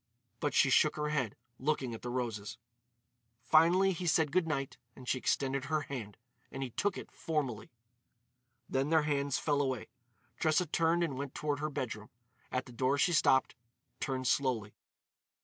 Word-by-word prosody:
But 145 Hz, -, -1 dB
she 135 Hz, -, +5 dB
shook 150 Hz, +4 st, +4 dB
her 150 Hz, 0 st, -1 dB
head, 135 Hz, -8 st, -1 dB, 0.2 s
looking 135 Hz, -3 st, 0 dB
at 115 Hz, -, -7 dB
the 125 Hz, -, -5 dB
roses. 120 Hz, -5 st, -3 dB, 0.9 s
Finally 170 Hz, +8 st, +5 dB
he 180 Hz, -1 st, -3 dB
said 160 Hz, -2 st, +3 dB
good 175 Hz, 0 st, +2 dB
night 140 Hz, -3 st, -2 dB, 0.2 s
and 125 Hz, -, -12 dB
she 130 Hz, -, +1 dB
extended 135 Hz, +1 st, 0 dB
her 155 Hz, +2 st, 0 dB
hand, 120 Hz, -8 st, -6 dB, 0.3 s
and 135 Hz, -, -4 dB
he 130 Hz, -, -5 dB
took 200 Hz, -, 0 dB
it -, -, -8 dB
formally. 145 Hz, -, -2 dB, 1.0 s
Then 135 Hz, +2 st, 0 dB
their 160 Hz, -1 st, +4 dB
hands 140 Hz, -2 st, 0 dB
fell 145 Hz, -2 st, +1 dB
away. 130 Hz, -4 st, -2 dB, 0.5 s
Tressa 155 Hz, +2 st, +3 dB
turned 165 Hz, +2 st, +2 dB
and 140 Hz, -6 st, -2 dB
went 140 Hz, -1 st, -5 dB
toward 145 Hz, -1 st, -1 dB
her 155 Hz, +1 st, -1 dB
bedroom. 115 Hz, -6 st, -4 dB, 0.4 s
At 130 Hz, 0 st, -1 dB
the 125 Hz, -, -12 dB
door 130 Hz, +3 st, +1 dB
she 175 Hz, +5 st, +3 dB
stopped, 130 Hz, -4 st, +4 dB, 0.5 s
turned 130 Hz, -1 st, -2 dB
slowly. 125 Hz, -6 st, +1 dB
140 Hz, 165 wpm, -33 LUFS, 130-155 Hz, 1.0 s, she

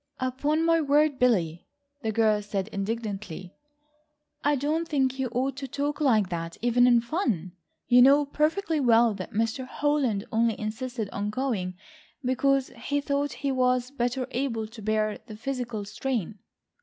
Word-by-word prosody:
"Upon 285 Hz, +5 st, 0 dB
my 330 Hz, 0 st, +4 dB
word, 290 Hz, -1 st, +3 dB
Billy," 175 Hz, -10 st, +1 dB, 0.3 s
the 220 Hz, -3 st, -1 dB
girl 215 Hz, -1 st, +2 dB
said 200 Hz, -1 st, -3 dB
indignantly, 200 Hz, -4 st, -4 dB, 0.9 s
"I 290 Hz, 0 st, +3 dB
don't 305 Hz, +5 st, -1 dB
think 265 Hz, -4 st, 0 dB
you 265 Hz, -, 0 dB
ought 255 Hz, +3 st, -1 dB
to 275 Hz, -1 st, -5 dB
talk 285 Hz, +3 st, -3 dB
like 220 Hz, -9 st, +3 dB
that 165 Hz, -1 st, -4 dB
even 245 Hz, +1 st, +4 dB
in 240 Hz, -1 st, +5 dB
fun. 230 Hz, -, -1 dB, 0.4 s
You 245 Hz, 0 st, +6 dB
know 280 Hz, +3 st, +6 dB
perfectly 315 Hz, +4 st, 0 dB
well 235 Hz, -3 st, +4 dB
that 190 Hz, -2 st, -6 dB
Mr. 225 Hz, +4 st, -1 dB
Holland 265 Hz, -8 st, 0 dB
only 225 Hz, -1 st, +1 dB
insisted 225 Hz, +1 st, -4 dB
on 205 Hz, +1 st, -2 dB
going 210 Hz, -6 st, -2 dB, 0.5 s
because 270 Hz, +1 st, +2 dB
he 275 Hz, +5 st, -2 dB
thought 285 Hz, 0 st, -1 dB
he 275 Hz, -, +2 dB
was 250 Hz, -1 st, +1 dB
better 250 Hz, -1 st, -1 dB
able 240 Hz, -4 st, -1 dB
to 225 Hz, -1 st, -11 dB
bear 215 Hz, 0 st, 0 dB
the 215 Hz, -, -8 dB
physical 240 Hz, -3 st, -4 dB
strain." 220 Hz, -2 st, -3 dB
245 Hz, 155 wpm, -27 LUFS, 215-275 Hz, 0.9 s, You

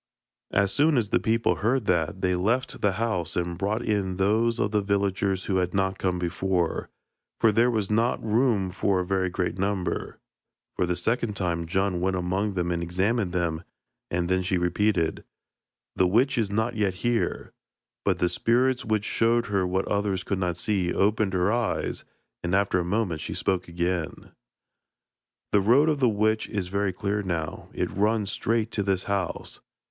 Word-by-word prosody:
As 100 Hz, 0 st, +2 dB
soon 150 Hz, +3 st, +3 dB
as 110 Hz, -4 st, +1 dB
the -, -, +2 dB
people 115 Hz, +1 st, +1 dB
heard 120 Hz, +2 st, +1 dB
that, 85 Hz, 0 st, 0 dB
they 90 Hz, -1 st, +2 dB
left 110 Hz, +9 st, 0 dB
the 100 Hz, -2 st, +2 dB
house 95 Hz, -6 st, -2 dB
and 85 Hz, 0 st, -1 dB
brought 105 Hz, +6 st, -1 dB
in 100 Hz, -4 st, -1 dB
those 110 Hz, +4 st, +2 dB
of 105 Hz, -, 0 dB
the 105 Hz, -1 st, +2 dB
villagers 100 Hz, -1 st, 0 dB
who 95 Hz, -, 0 dB
had 90 Hz, 0 st, -1 dB
not 95 Hz, 0 st, 0 dB
come 90 Hz, -1 st, 0 dB
before, 90 Hz, 0 st, -1 dB, 0.5 s
for 110 Hz, -, +5 dB
there 115 Hz, +4 st, +3 dB
was 110 Hz, -4 st, -1 dB
not 115 Hz, +3 st, +2 dB
room 110 Hz, -4 st, +2 dB
for 95 Hz, +1 st, +1 dB
a 90 Hz, -, -1 dB
very 95 Hz, 0 st, 0 dB
great 90 Hz, +1 st, -2 dB
number. 95 Hz, -1 st, -2 dB, 0.6 s
For 90 Hz, -, 0 dB
the 90 Hz, -, 0 dB
second 110 Hz, +4 st, -1 dB
time 85 Hz, -3 st, -1 dB
Djun 95 Hz, 0 st, 0 dB
went 95 Hz, +1 st, 0 dB
among 95 Hz, +3 st, -1 dB
them 90 Hz, -1 st, -1 dB
and 85 Hz, -1 st, -1 dB
examined 95 Hz, +4 st, 0 dB
them, 85 Hz, -2 st, -1 dB, 0.5 s
and 85 Hz, 0 st, -1 dB
then 95 Hz, +1 st, +1 dB
she 95 Hz, 0 st, 0 dB
repeated: 90 Hz, -1 st, 0 dB, 0.7 s
'The 90 Hz, -, +3 dB
witch 125 Hz, +9 st, +3 dB
is 110 Hz, -5 st, 0 dB
not 110 Hz, +4 st, -1 dB
yet 100 Hz, -3 st, 0 dB
here.' 120 Hz, -1 st, -1 dB, 0.5 s
But -, -, +1 dB
the 90 Hz, -, +2 dB
spirits, 125 Hz, +6 st, +1 dB
which 110 Hz, -1 st, 0 dB
showed 115 Hz, +1 st, +2 dB
her 95 Hz, -2 st, +1 dB
what 95 Hz, +1 st, -1 dB
others 100 Hz, -2 st, 0 dB
could 100 Hz, -, -2 dB
not 90 Hz, -2 st, -1 dB
see, 95 Hz, -2 st, 0 dB
opened 105 Hz, -1 st, +1 dB
her 90 Hz, +2 st, +2 dB
eyes, 120 Hz, 0 st, -1 dB, 0.4 s
and 85 Hz, +2 st, 0 dB
after 100 Hz, -2 st, +2 dB
a -, -, 0 dB
moment 90 Hz, -3 st, -1 dB
she -, -, -5 dB
spoke 95 Hz, -1 st, -1 dB
again. 85 Hz, -1 st, -3 dB, 1.2 s
'The 105 Hz, -, +4 dB
road 130 Hz, +10 st, +4 dB
of 150 Hz, -2 st, 0 dB
the 125 Hz, -3 st, +4 dB
witch 110 Hz, +1 st, +1 dB
is 100 Hz, -4 st, -3 dB
very 100 Hz, 0 st, 0 dB
clear 100 Hz, +3 st, -2 dB
now; 85 Hz, -5 st, -4 dB
it -, -, -2 dB
runs 105 Hz, 0 st, +1 dB
straight 115 Hz, 0 st, 0 dB
to 105 Hz, -, -1 dB
this 95 Hz, -2 st, 0 dB
house.' 100 Hz, -3 st, -3 dB
100 Hz, 180 wpm, -26 LUFS, 90-110 Hz, 1.2 s, for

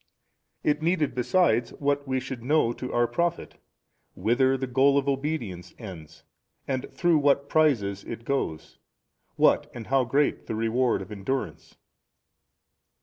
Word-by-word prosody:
It 150 Hz, 0 st, +1 dB
needed 160 Hz, -2 st, +1 dB
besides 125 Hz, -2 st, +2 dB
what 140 Hz, 0 st, -1 dB
we 130 Hz, 0 st, 0 dB
should 130 Hz, -1 st, -6 dB
know 130 Hz, -2 st, +2 dB
to 125 Hz, +1 st, -6 dB
our 120 Hz, 0 st, +2 dB
profit, 170 Hz, +8 st, -2 dB, 0.6 s
whither 130 Hz, +4 st, +2 dB
the 130 Hz, -, -2 dB
goal 135 Hz, +3 st, +3 dB
of 140 Hz, 0 st, 0 dB
obedience 135 Hz, -, -3 dB
ends 90 Hz, -9 st, -10 dB, 0.4 s
and 130 Hz, -1 st, -3 dB
through 170 Hz, -3 st, +2 dB
what 140 Hz, -1 st, +2 dB
prizes 115 Hz, -12 st, +2 dB
it 115 Hz, 0 st, -8 dB
goes, 125 Hz, -, -3 dB, 0.6 s
what -, -, +3 dB
and 115 Hz, -, -7 dB
how 130 Hz, +1 st, +2 dB
great 140 Hz, +5 st, 0 dB
the 110 Hz, -, -3 dB
reward 115 Hz, +3 st, +1 dB
of -, -, -14 dB
endurance. 105 Hz, +7 st, -4 dB
130 Hz, 140 wpm, -26 LUFS, 115-145 Hz, 0.6 s, goal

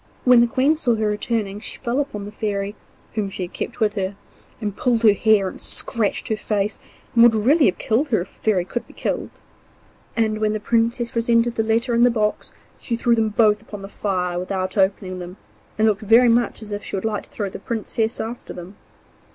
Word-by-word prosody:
When 250 Hz, -2 st, +7 dB
the 240 Hz, -, +4 dB
Queen 265 Hz, +6 st, +2 dB
saw 245 Hz, -7 st, +1 dB
her 220 Hz, 0 st, -1 dB
returning 210 Hz, -1 st, -1 dB
she -, -, -5 dB
fell 240 Hz, +3 st, -1 dB
upon 245 Hz, -8 st, -3 dB
the 205 Hz, -, -8 dB
Fairy, 205 Hz, -2 st, -2 dB, 0.4 s
whom 210 Hz, -2 st, -1 dB
she 190 Hz, -, -5 dB
had 175 Hz, -, -7 dB
kept 235 Hz, -, -5 dB
with 215 Hz, -2 st, +2 dB
her, 195 Hz, -1 st, -2 dB, 0.4 s
and 205 Hz, -3 st, -3 dB
pulled 240 Hz, -2 st, +1 dB
her 215 Hz, -2 st, +7 dB
hair, 210 Hz, -2 st, +3 dB
and -, -, -8 dB
scratched 225 Hz, -5 st, -1 dB
her 220 Hz, -, +1 dB
face, 210 Hz, -1 st, -1 dB, 0.3 s
and 235 Hz, -, +5 dB
would 235 Hz, -1 st, +7 dB
really 275 Hz, +8 st, +4 dB
have 180 Hz, -, 0 dB
killed 255 Hz, +7 st, 0 dB
her 225 Hz, -, +2 dB
if 185 Hz, -, -8 dB
a -, -, -26 dB
Fairy 195 Hz, -5 st, +1 dB
could 235 Hz, +6 st, -4 dB
be -, -, -16 dB
killed. -, -, -3 dB, 0.9 s
And 220 Hz, -1 st, +1 dB
when 215 Hz, 0 st, +1 dB
the 215 Hz, -, -2 dB
Princess 235 Hz, +2 st, 0 dB
presented 230 Hz, 0 st, +2 dB
the 225 Hz, -, 0 dB
letter 230 Hz, +3 st, +1 dB
and 235 Hz, +1 st, +4 dB
the 245 Hz, -, +6 dB
box 215 Hz, -3 st, -1 dB, 0.3 s
she 235 Hz, -, -2 dB
threw 235 Hz, +1 st, +2 dB
them 225 Hz, -1 st, +2 dB
both 210 Hz, -1 st, +3 dB
upon 205 Hz, -2 st, -9 dB
the 195 Hz, -, -8 dB
fire 180 Hz, -4 st, -2 dB
without 185 Hz, 0 st, -3 dB
opening 190 Hz, -2 st, 0 dB
them, 180 Hz, +2 st, -8 dB, 0.4 s
and 220 Hz, +1 st, +3 dB
looked 205 Hz, -3 st, +1 dB
very 230 Hz, +3 st, +5 dB
much 230 Hz, -1 st, +1 dB
as 210 Hz, -, -9 dB
if 205 Hz, 0 st, -4 dB
she -, -, -5 dB
would 195 Hz, -, -3 dB
like 215 Hz, -2 st, -1 dB
to -, -, -24 dB
throw 205 Hz, -2 st, -4 dB
the -, -, -7 dB
Princess 225 Hz, 0 st, -2 dB
after 235 Hz, +2 st, -5 dB
them. 180 Hz, +3 st, -10 dB
220 Hz, 225 wpm, -22 LUFS, 200-235 Hz, 0.9 s, When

